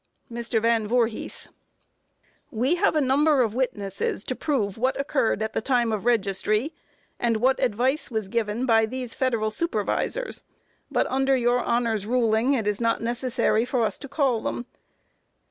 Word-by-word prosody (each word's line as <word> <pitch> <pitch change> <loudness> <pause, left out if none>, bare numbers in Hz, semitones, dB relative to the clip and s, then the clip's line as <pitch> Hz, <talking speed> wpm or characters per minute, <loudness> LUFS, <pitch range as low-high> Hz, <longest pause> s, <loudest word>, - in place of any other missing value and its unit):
MR. 235 -1 -1
VAN 225 -1 +1
VOORHIS: 230 -1 -1 1.0
We 250 +7 +1
have 350 - +2
a 305 - +3
number 285 +1 +3
of 220 -3 -2
witnesses 205 -6 -2
to 255 - -3
prove 230 -12 -1
what 255 +4 0
occurred 270 -6 0
at 220 - -3
the - - -1
time 240 -1 +1
of 215 -1 -3
registry, 215 - +1 0.5
and 230 -2 +1
what 260 +4 +2
advice 255 +5 0
was 220 -4 -2
given 225 +3 -1
by 225 -2 +4
these 250 0 -5
federal 230 -5 0
supervisors, 340 - -2 0.5
but - - +1
under 270 0 +2
your 245 0 +2
Honor's 230 -4 0
ruling 235 +1 +2
it 225 -5 -1
is 210 +1 -1
not 230 0 +1
necessary 235 -1 0
for 250 -1 0
us - - -3
to 280 - -7
call 270 -6 +1
them. 240 - -3
235 Hz, 160 wpm, -25 LUFS, 220-260 Hz, 1.0 s, by